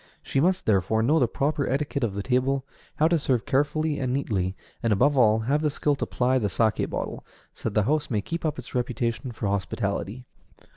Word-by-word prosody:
She - - 0
must, 180 +5 +2
therefore, 110 +2 +2
know 150 +7 +4
the 125 - +3
proper 140 +4 -1
etiquette 140 0 -1
of 105 -4 -1
the 100 - -3
table, 130 +2 +1 0.3
how 155 - +4
to 170 -1 +2
serve 130 -5 0
carefully 145 +2 +1
and 130 -2 -1
neatly, 100 -9 -1 0.3
and, 115 - +1
above 135 +9 +3
all, 110 -4 +4
have 140 +7 +1
the 155 - +2
skill 145 +1 0
to - - -2
ply 130 +1 +1
the 105 - 0
saké 110 +2 +1
bottle, - - -4 0.3
so - - -3
that 105 - -11
the 105 - +4
house 150 +1 +1
may 110 -5 +1
keep 165 +11 -4
up 155 -2 -1
its 125 - -9
reputation 120 +1 -2
for 110 - -5
hospitality. 100 +3 -2
125 Hz, 210 wpm, -26 LUFS, 110-145 Hz, 0.3 s, know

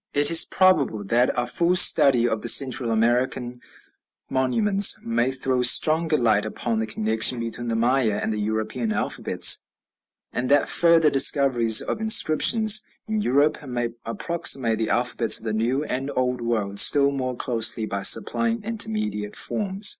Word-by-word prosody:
It 145 +2 +1
is 165 - +5
probable 155 - -1
that 120 +5 -1
a 120 - -3
full 170 +7 -2
study 140 -9 +4
of 110 -2 -4
the - - -8
Central 130 -1 +3
American 120 +2 -3 0.7
monuments 195 - +1
may 120 +2 -2
throw 130 -1 -3
stronger 155 +5 +3
light 110 -4 -1
upon 110 +1 -5
the 110 - -4
connection 110 +3 0
between 115 +1 -6
the 115 - -3
Maya 115 -2 -1
and 110 - -4
the 105 - -6
European 110 +2 -5
alphabets, - - +1 0.7
and 125 +1 -5
that 145 0 +1
further 165 -2 +3
discoveries 130 -5 +3
of - - -6
inscriptions 220 +1 +4 0.3
in 215 -1 -4
Europe 145 +1 -1
may 120 -2 -5
approximate 125 -3 -1
the 110 - -4
alphabets 120 -2 +1
of - - -4
the 110 -2 -5
New 120 +6 -3
and 135 -1 -6
Old 125 -1 -3
World 105 -4 -3
still 140 -1 +4
more 130 -2 -6
closely 115 -2 0
by 100 -2 -6
supplying 230 - +1
intermediate 215 - -3
forms. 200 -1 0
125 Hz, 155 wpm, -21 LUFS, 115-155 Hz, 0.7 s, is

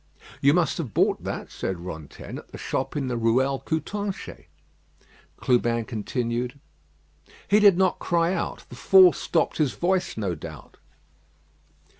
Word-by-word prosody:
"You 140 +3 +5
must 175 -2 +1
have 130 - -5
bought - - +2
that," - - -5
said 95 -2 -4
Rantaine, 80 -5 -8
"at - - -15
the - - -8
shop - - -3
in 140 - -1
the 125 -2 -2
Ruelle 130 +4 +2
Coutanchez." 195 +6 -4 0.9
Clubin 120 -2 +1
continued: 120 +3 -3 0.9
"He 210 - +5
did 200 -4 +6
not 190 -1 +2
cry 170 +1 +1
out. 175 - -4
The - - -10
fall 185 -2 +7
stopped 165 - -1
his 145 -5 +1
voice, 180 -3 0
no 100 -5 -1
doubt." 80 -1 -10
135 Hz, 140 wpm, -25 LUFS, 115-175 Hz, 0.9 s, fall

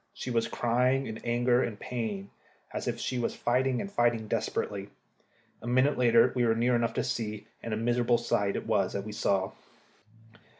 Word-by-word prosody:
She 125 - -5
was 115 -1 +1
crying 125 +4 +1
in 110 -2 -6
anger 120 +1 +2
and 105 -3 -3
pain, 110 -5 -4 0.4
as - - -4
if - - -1
she 125 - -2
was 120 - -1
fighting, 125 +1 +1
and 200 - -5
fighting 120 - +1
desperately. 100 -1 -2 0.7
A - - -7
minute 130 +4 +3
later 120 0 +5
we 125 - +2
were 115 -1 +3
near 120 +2 +2
enough 120 -1 0
to - - +1
see, 110 -4 -3 0.2
and 115 - -5
a 110 - 0
miserable 120 +1 +2
sight 100 -4 0
it - - -3
was - - +1
that 100 - -2
we 110 - -5
saw. 95 -2 0
120 Hz, 185 wpm, -29 LUFS, 110-125 Hz, 0.7 s, later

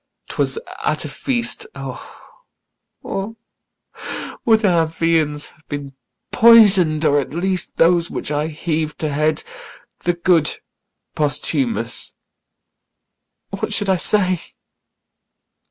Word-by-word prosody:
'twas - - 0 0.3
at - - 0
a - - -3
feast 245 - -2
O, - - -10 2.1
would 220 -1 +3
Our 170 -4 +3
viands 160 -2 0
had 155 - -27
been 145 -2 -6 0.4
poison'd, 195 -9 +6
or 145 -1 +4
at 140 +2 -5
least 185 0 -2
Those 170 0 +3
which - - -5
I 150 +1 0
heav'd 155 0 -3
to 155 - 0
head! 155 +2 +1 0.6
the 175 - 0
good 170 -3 +2 0.6
Posthumus 155 - -1 1.4
What - - -3
should 205 -2 0
I 190 - +3
say? 185 -1 +3
165 Hz, 105 wpm, -19 LUFS, 155-190 Hz, 2.1 s, poison'd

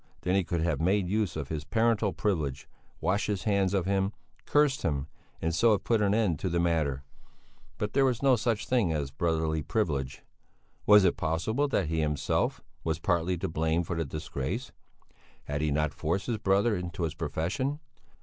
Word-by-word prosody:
Then 90 - 0
he 95 0 +3
could 85 -1 -2
have 80 -3 0
made 95 +2 +2
use 105 -2 0
of 75 -4 -4
his 75 -2 -3
parental 110 +1 +1
privilege, 80 -7 -2 0.3
washed 100 +3 0
his 100 -3 -2
hands 100 -3 +2
of 95 -3 +1
him, 95 +1 0 0.3
cursed 145 -2 +3
him, 70 -4 -1 0.4
and 80 +1 0
so 115 +6 +4
have 100 - -1
put 115 -2 +2
an 100 0 +3
end 100 -9 +1
to 95 - -1
the 85 0 0
matter; 80 -6 0 0.7
but 105 0 -3
there 135 - +4
was 130 -2 +1
no 135 -2 +6
such 115 -2 -1
thing 120 -10 +2
as 75 -4 -2
a - - -30
brotherly 80 0 0
privilege. 70 - -2 0.6
Was 105 -1 +8
it 90 - +2
possible 110 - 0
that 100 -9 +1
he 80 0 0
himself, 75 -2 0 0.2
was 80 -1 -1
partly 85 +1 0
to 95 - -2
blame 80 +1 0
for 85 - -4
the 80 - 0
disgrace? 70 -2 -4 0.7
Had 75 0 -3
he 75 - +1
not 75 +1 0
forced 85 +5 -1
his 115 -3 -2
brother 100 +3 +2
into 90 -1 -4
his 80 -2 -1
profession? 85 - -2
90 Hz, 190 wpm, -29 LUFS, 80-105 Hz, 0.7 s, Was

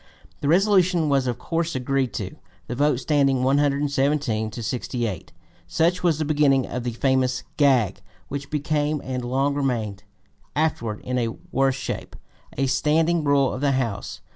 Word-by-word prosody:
The 140 - -2
resolution 180 -2 +3
was 135 -2 +2
of 120 -1 -1
course 165 +4 -2
agreed 130 -1 0
to, - - -5 0.3
the 120 - -5
vote 145 +3 +2
standing 135 0 +2
117 140 -4 +1
to 115 +2 -7
68. 115 -5 -3 0.4
Such 170 - +1
was 170 -4 +2
the 155 - -1
beginning 145 -3 +3
of 125 - -4
the 120 -1 -3
famous 130 +1 +1
"gag" 130 -9 +3 0.3
which 140 0 -5
became 150 0 0
and 130 -1 -3
long 135 +3 0
remained 120 -8 -2 0.5
afterward 120 -9 -1
in 125 0 -2
a 115 - 0 0.2
worse 135 0 +2
shape 135 - -5 0.4
a 135 - +2
standing 160 +4 +2
rule 140 -2 +3
of 130 - -5
the 140 -1 +2
House. 115 -6 -3
135 Hz, 155 wpm, -24 LUFS, 125-150 Hz, 0.5 s, resolution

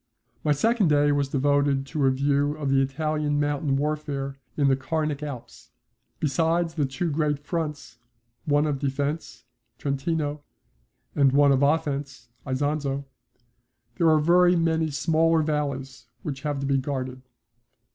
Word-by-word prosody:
My 150 - +2
second 220 - +2
day 145 -1 +3
was 140 -1 0
devoted 140 0 +1
to 140 -1 0
a - - +5
view 140 +2 +1
of 145 -3 -2
the 135 0 +4
Italian 150 +2 -1
mountain 145 -1 0
warfare 145 -1 -2 0.2
in 145 -2 +3
the 135 - +4
Carnic 150 +2 -2
Alps. 140 -5 -8 0.5
Besides 165 +3 +1
the 150 -4 0
two 155 +6 -2
great 150 -1 0
fronts, 150 -4 -5 0.5
one 145 -1 +2
of 145 -3 -1
defence 140 +3 -3 0.3
(Trentino) 145 +1 -2 0.7
and 140 -2 +4
one 140 +1 +5
of 135 0 +3
offence 140 -4 -1 0.2
(Isonzo), 140 +1 -1 0.9
there 165 - +4
are 155 - +5
very 175 +3 +4
many 165 -1 +1
smaller 160 +2 +2
valleys 140 -4 -3 0.2
which 140 -3 -5
have 145 -2 -2
to - - -2
be 135 0 +2
guarded. 130 -2 -4
145 Hz, 140 wpm, -25 LUFS, 140-155 Hz, 0.9 s, a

